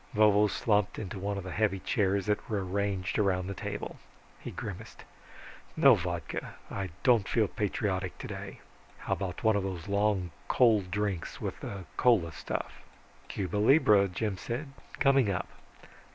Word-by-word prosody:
Vovo 105 -1 +5
slumped 105 -1 +1
into 100 -2 -5
one 100 +1 -2
of 100 - -4
the 90 - -6
heavy 105 0 +1
chairs 100 0 0
that 105 0 -1
were 100 -4 -1
arranged 95 0 -1
around 95 -3 +1
the 100 - -4
table. - - -5 0.4
He - - -7
grimaced, - - -7 0.7
"No - - +8
vodka, - - -3 0.2
I 95 -1 -3
don't 120 -6 +4
feel 110 -3 +2
patriotic 95 -2 -2
today. - - -7 0.4
How - - -2
about 95 +2 -4
one 110 -1 +4
of 100 - +1
those 95 -3 -5
long 100 -3 +1 0.2
cold 110 -7 +4
drinks, 100 -2 -2
with - - -4
the 100 -2 -6
cola 105 -10 +4
stuff?" - - -5 0.5
"Cuba 95 0 -3
libra," 105 -3 +5
Jim 95 +2 -2
said. 125 +8 -5 0.3
"Coming 135 -5 +4
up. 95 -1 -1
100 Hz, 150 wpm, -30 LUFS, 95-105 Hz, 0.7 s, No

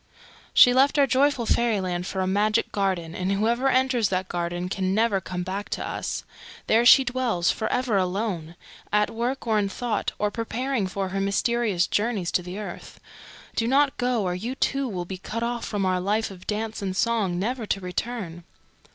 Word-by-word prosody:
"She 245 - +7
left 275 +3 +4
our 285 - +6
joyful 270 -1 +2
Fairyland 190 -7 0
for 190 - -2
a - - +1
Magic 210 +3 +1
Garden, 185 -5 -1
and 185 +1 -2
whoever 235 +6 +1
enters 255 -5 +2
that 185 0 -2
Garden 175 +1 -2
can 190 0 -1
never 215 -3 +2
come 180 -1 -4
back 195 +3 -4
to - - -3
us. - - -4 0.4
There 230 +2 +4
she 270 - +9
dwells 245 -8 0
for 220 - -3
ever 250 -5 +1
alone, 185 -3 -2 0.4
at 210 0 +2
work 240 +4 -2
or 220 -2 +2
in 200 -1 0
thought, 230 +1 -2
or 210 0 0
preparing 235 0 -2
for 190 0 -3
her 195 +1 -2
mysterious 200 -2 +1
journeys 205 -4 -1
to - - +1
the 180 +2 -7
earth. 210 - -8 0.6
Do 230 - 0
not 275 +2 +3
go, 245 -3 0
or 180 -1 -1
you 225 +9 -4
too 275 0 0
will 180 -6 -4
be 185 +1 -7
cut 230 +4 -4
off 240 0 -2
from 205 -3 -1
our 185 -1 +1
life 210 +3 0
of 185 -1 -13
dance 220 +1 -3
and 190 -1 -3
song, 215 -7 +1
never 225 +4 -2
to 195 - 0
return." 180 -2 -4
210 Hz, 190 wpm, -25 LUFS, 185-240 Hz, 0.6 s, she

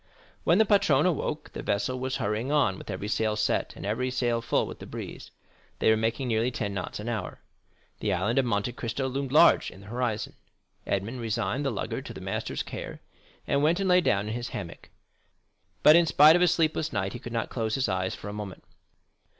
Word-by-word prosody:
When 170 - +5
the 220 - +5
patron 170 -9 +3
awoke, 155 -3 -2
the - - -5
vessel 105 +6 -1
was 130 0 -2
hurrying 110 +6 -2
on 145 -11 +2
with - - -11
every 100 +1 -4
sail 110 0 0
set, 105 0 0
and - - -8
every 115 +5 -1
sail 120 -2 0
full - - +1
with - - -9
the - - -9
breeze. - - -8 0.5
They - - +3
were - - +5
making 115 +4 -1
nearly 115 +1 +1
ten 100 -5 -3
knots 95 +1 -4
an 105 - -6
hour. 110 -5 -4 0.6
The 105 - -1
Island 105 +8 +1
of 135 - +2
Monte 115 0 0
Cristo 120 +3 -3
loomed 135 0 -3
large 160 +4 +6
in 95 - -14
the - - -14
horizon. 110 -1 -2 0.5
Edmond 110 +6 -2
resigned 115 +4 -1
the 135 - +1
lugger 110 -6 -3
to - - -8
the - - -7
master's - - -3
care, - - -7 0.5
and 140 - +1
went 165 +5 +3
and 195 - 0
lay 180 0 +5
down 100 - +1
in 110 - -3
his 120 +1 -4
hammock; - - -7 0.9
but, 150 - +9
in 170 -1 +5
spite 155 +2 +7
of 175 - +2
a 180 - +5
sleepless 160 -2 +1
night, 95 -3 -2
he 120 - -6
could 120 - -8
not 115 -1 -2
close 110 -3 -1
his 135 -2 0
eyes 95 -1 -1
for - - -9
a 105 - -5
moment. 105 -3 -7
120 Hz, 215 wpm, -27 LUFS, 105-140 Hz, 0.9 s, but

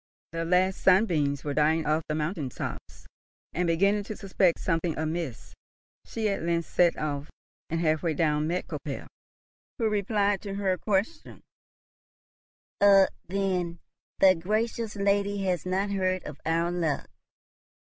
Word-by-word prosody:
The 165 0 -3
last 185 +2 +2
sunbeams 165 -8 +3
were 145 - -2
dying 155 +2 +2
off 155 +2 +2
the 150 - 0
mountain 155 -2 -2
tops, - - -7 0.5
and, 175 0 0
beginning 200 +5 +2
to 215 - -6
suspect 190 -3 +1
something 165 -2 -1
amiss, 160 -4 -4 0.5
she 220 -2 -2
at 200 - -1
length 170 0 0
set 175 -1 +2
off, 145 0 -3 0.4
and 165 - -1
half 155 -2 +2
way 165 -3 0
down 150 -1 +1
met 175 +2 -1
Koppel, - - -6 0.7
who 230 - +1
replied 205 -1 +1
to 200 -2 -5
her 190 -2 0
question, 210 - -2 1.4
"Ah, 195 -1 +7 0.2
then, 180 -3 -1 0.4
the 190 -1 +7
gracious 215 +5 -2
lady 200 0 +1
has 185 -2 -1
not 195 +2 0
heard 185 -1 0
of 150 - -9
our 165 +1 +1
luck. 165 -5 -1
180 Hz, 140 wpm, -27 LUFS, 160-200 Hz, 1.4 s, Ah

